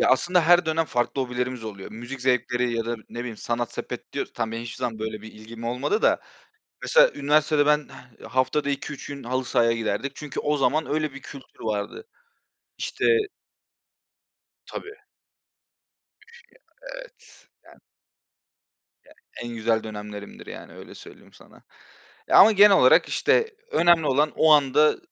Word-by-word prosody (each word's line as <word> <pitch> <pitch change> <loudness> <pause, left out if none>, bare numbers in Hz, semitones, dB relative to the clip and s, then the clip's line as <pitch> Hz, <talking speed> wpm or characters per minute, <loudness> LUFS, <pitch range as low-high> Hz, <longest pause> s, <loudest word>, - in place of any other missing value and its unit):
Ya, - - +3
aslında 175 +8 +3
her 175 0 +5
dönem 160 +1 +1
farklı 120 +2 -1
hobilerimiz 125 -1 -4
oluyor. 100 -3 -8
Müzik 120 +4 -8
zevkleri, 125 -1 0
ya 115 - -1
da, 120 0 -2
ne 120 - -9
bileyim, 120 -3 -6
sanat 120 +1 -3
sepet - - -7
diyoruz. - - -4
Tamam, 115 -2 -3
benim 115 +1 -4
hiçbir 115 -2 -8
zaman 120 -3 -3
böyle 110 -1 -5
bir 110 - -11
ilgim 115 +2 -11
olmadı 135 - -1
da, - - +3 0.6
mesela, - - +5
üniversitede 150 +1 +2
ben 150 0 +2 0.4
haftada 130 +3 0
2-3 140 0 -5
gün, 140 -1 -8
halı 130 +1 -2
sahaya 120 -2 +2
giderdik. 115 +4 -3
Çünkü, 150 -2 -6
o 150 0 0
zaman, 155 +3 +1
öyle 155 -1 -1
bir 140 - -10
kültür 135 -3 -13
vardı. 110 - -4 0.7
İşte - - -3 1.6
Tabii. 415 +1 -8 1.3
Üf, 470 +1 -16 0.5
ya, - - -10
evet, - - -15 0.2
yani. - - -20 1.2
Yani, - - -20 0.3
en 120 0 -6
güzel 110 0 0
dönemlerimdir 105 -1 -8
yani, - - -10
öyle - - -12
söyleyeyim - - -15
sana, - - -19 0.7
ya - - +6
ama, 220 +3 +8
genel 205 -1 +7
olarak - - +5
işte, 450 -2 +1 0.2
önemli 170 - +4
olan, 145 +2 +2
o 160 -1 +5
anda 150 +1 +4
130 Hz, 155 wpm, -24 LUFS, 115-155 Hz, 1.6 s, ama